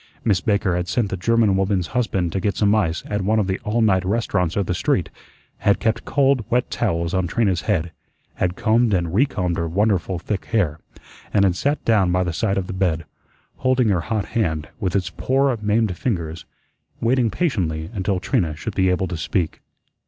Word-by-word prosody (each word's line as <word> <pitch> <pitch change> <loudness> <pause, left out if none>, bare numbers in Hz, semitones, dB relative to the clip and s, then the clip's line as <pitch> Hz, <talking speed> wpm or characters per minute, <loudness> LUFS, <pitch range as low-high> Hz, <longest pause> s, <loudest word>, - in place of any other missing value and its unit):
Miss 100 -5 +2
Baker 100 -4 +1
had 90 0 -2
sent 115 -1 0
the - - 0
German 110 +1 +2
woman's 95 -1 +1
husband 95 -8 0
to 95 - -1
get 100 +1 -1
some 105 -1 +3
ice 90 -7 0
at 105 -1 -2
one 105 +4 +1
of 105 - +2
the 95 0 -2
"all 110 +2 0
night" 95 -4 +3
restaurants 95 -4 0
of 100 - +1
the 90 - -1
street; - - 0 0.5
had 100 - +2
kept 110 0 0
cold, 135 -3 +2
wet 125 +1 +1
towels 85 -6 -1
on 95 -1 +1
Trina's 95 -2 +1
head; 85 -5 -1 0.4
had 90 0 -1
combed 110 0 +2
and 85 -2 -1
recombed 95 -7 +1
her 85 - -1
wonderful 95 0 +1
thick 100 +3 -4
hair; 85 -9 0 0.5
and 100 -1 +4
had 90 -2 +2
sat 145 +9 -1
down 105 -6 +3
by 90 +1 +2
the 90 -2 -2
side 100 +2 0
of 95 - -1
the 95 - -6
bed, 85 -4 0 0.5
holding 130 -3 +2
her 90 -4 +2
hot 105 +1 -2
hand, 80 -9 -1
with 95 -1 -1
its 95 -2 0
poor 135 0 +1
maimed 105 -2 +1
fingers, 85 -8 -3 0.5
waiting 120 0 +2
patiently 90 - -1
until 95 -2 -1
Trina 80 -3 0
should 95 +7 -5
be 95 -1 +2
able 90 +1 +1
to 90 - -4
speak. 85 +1 -2
95 Hz, 195 wpm, -22 LUFS, 90-110 Hz, 0.5 s, and